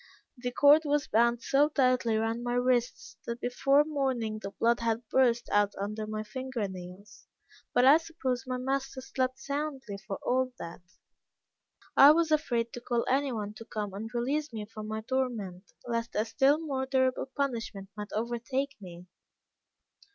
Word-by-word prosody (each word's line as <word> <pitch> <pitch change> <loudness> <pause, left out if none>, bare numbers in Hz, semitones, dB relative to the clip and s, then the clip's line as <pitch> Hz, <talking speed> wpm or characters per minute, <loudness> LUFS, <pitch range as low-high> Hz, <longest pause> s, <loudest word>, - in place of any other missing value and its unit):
The 245 -1 -4
cord 290 +4 +6
was 295 -1 +1
bound 235 +2 +2
so 285 +2 +3
tightly 255 -5 +2
round 225 +2 -1
my 240 0 -1
wrists, 245 -1 0
that 235 0 -3
before 275 +4 +3
morning 260 -8 -1
the 195 - -5
blood 235 +3 +1
had 230 0 -1
burst 240 -3 +3
out 205 0 +2
under 210 +2 -3
my 215 0 -3
finger 260 -1 -4
nails; 185 +2 -11 0.4
but 245 - +4
I 280 +4 +8
suppose 270 -7 -3
my 255 0 -2
master 270 +1 -2
slept 260 0 -2
soundly 280 -7 -4
for 195 0 -6
all 255 0 +1
that. 170 +1 -8 1.1
I 285 +2 +9
was 330 0 +1
afraid 240 -7 +1
to 245 - -7
call 240 -1 -1
any 275 +1 +1
one 210 -3 -4
to 225 - -10
come 210 -3 -4
and 215 +3 -5
release 275 +5 -1
me 215 -2 -5
from 215 0 -8
my 220 0 -3
torment, 220 -7 -3 0.2
lest 230 0 -2
a 215 - +1
still 270 +5 +3
more 275 -5 -3
terrible 260 -1 +1
punishment 230 -8 -3
might 210 -1 -7
overtake 240 +5 -2
me. 175 -2 -10
245 Hz, 165 wpm, -29 LUFS, 220-270 Hz, 1.1 s, I